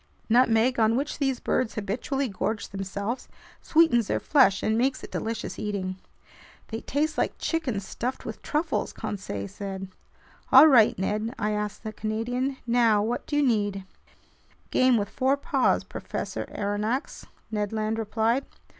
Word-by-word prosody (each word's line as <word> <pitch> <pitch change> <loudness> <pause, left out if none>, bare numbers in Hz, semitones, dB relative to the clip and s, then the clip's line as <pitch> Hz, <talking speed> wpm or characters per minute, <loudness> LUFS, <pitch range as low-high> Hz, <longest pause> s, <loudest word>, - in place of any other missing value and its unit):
Nutmeg, 235 +1 +4
on 220 0 +4
which 285 +4 -2
these 270 -4 0
birds 250 -3 -1
habitually 250 +7 -2
gorge 205 +1 -3
themselves, 200 +5 -4 0.3
sweetens 275 -9 +4
their - - 0
flesh 260 -10 +4
and 220 - +2
makes 260 +4 0
it - - -9
delicious 225 +1 -4
eating. 195 -3 -3 0.7
"They 225 0 -4
taste 305 +3 -1
like - - 0
chicken 305 -11 -1
stuffed 235 +6 -5
with - - -6
truffles," 305 +3 -1
Conseil 105 - -5
said. 195 - -6 0.6
"All 265 +4 +10
right, 240 -7 +6
Ned," 215 +5 -2
I 210 -1 0
asked 210 0 -3
the 215 -1 -5
Canadian, 245 +6 -2
"now 230 -3 +3
what 235 +3 -2
do 290 - -2
you 295 - +3
need?" 205 -6 +1 0.9
"Game 255 -2 +4
with 205 -1 -1
four 265 +5 +1
paws, 280 - +1
Professor - - -5
Aronnax," 210 +6 -2 0.3
Ned 210 -2 -1
Land 220 0 -1
replied. 225 +4 0
225 Hz, 145 wpm, -26 LUFS, 205-260 Hz, 0.9 s, All